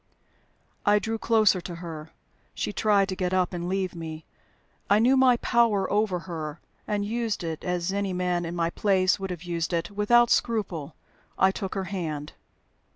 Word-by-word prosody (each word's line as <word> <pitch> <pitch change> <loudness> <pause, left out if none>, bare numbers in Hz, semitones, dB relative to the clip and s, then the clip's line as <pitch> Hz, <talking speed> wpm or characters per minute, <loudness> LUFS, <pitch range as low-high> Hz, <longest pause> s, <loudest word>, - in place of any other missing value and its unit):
I 205 0 +4
drew 225 +2 -2
closer 215 -5 +3
to 175 0 -7
her. 165 -2 -8 0.5
She 205 - -3
tried 205 -2 +3
to 185 - -2
get 180 0 -1
up 185 0 +1
and 175 0 -3
leave 190 -1 -1
me. 160 -2 -7 0.6
I 205 - +6
knew 245 +5 +4
my 260 -2 +5
power 230 -6 +2
over 205 -4 +1
her, 160 -3 -6 0.3
and 205 -1 -1
used 225 -2 -2
it 160 -2 -4
(as 180 0 -1
any 200 -1 -1
man 180 -1 0
in 170 +1 -4
my 170 -1 0
place 190 -1 +2
would 195 0 -4
have 175 -2 -6
used 170 -1 -2
it) 170 +3 -1
without 235 +4 +4
scruple. 185 - 0 0.4
I 190 0 +4
took 190 0 -5
her 195 - -1
hand. 160 -6 -4
185 Hz, 175 wpm, -26 LUFS, 170-210 Hz, 0.6 s, I